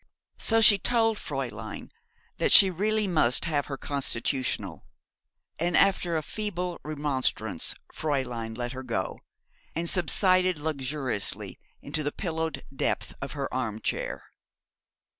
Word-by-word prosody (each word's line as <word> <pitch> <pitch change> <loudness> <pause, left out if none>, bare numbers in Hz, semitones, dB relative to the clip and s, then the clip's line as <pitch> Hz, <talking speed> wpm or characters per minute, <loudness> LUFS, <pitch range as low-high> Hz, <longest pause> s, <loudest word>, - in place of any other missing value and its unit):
So 225 0 +3
she 210 -2 +8
told 225 0 +2
Fräulein 120 - -5 0.5
that - - +2
she 190 -1 +10
really 210 +4 0
must 155 -10 +3
have 145 -4 0
her 135 - -4
constitutional; 130 - -1 0.8
and 170 +1 +1
after 180 -4 +3
a 155 - -2
feeble 180 -3 -3
remonstrance 145 -3 -1 0.2
Fräulein 125 -7 -2
let 120 -1 -3
her 130 0 -6
go, 115 -7 -3 0.6
and 170 +1 -2
subsided 185 +1 +3
luxuriously 140 -6 -2 0.2
into 155 - -2
the 145 0 -1
pillowed 160 -3 -3
depth - - -1
of 140 - -4
her 140 -2 -3
arm 115 -4 -2
chair. - - -3
150 Hz, 120 wpm, -27 LUFS, 130-180 Hz, 0.8 s, she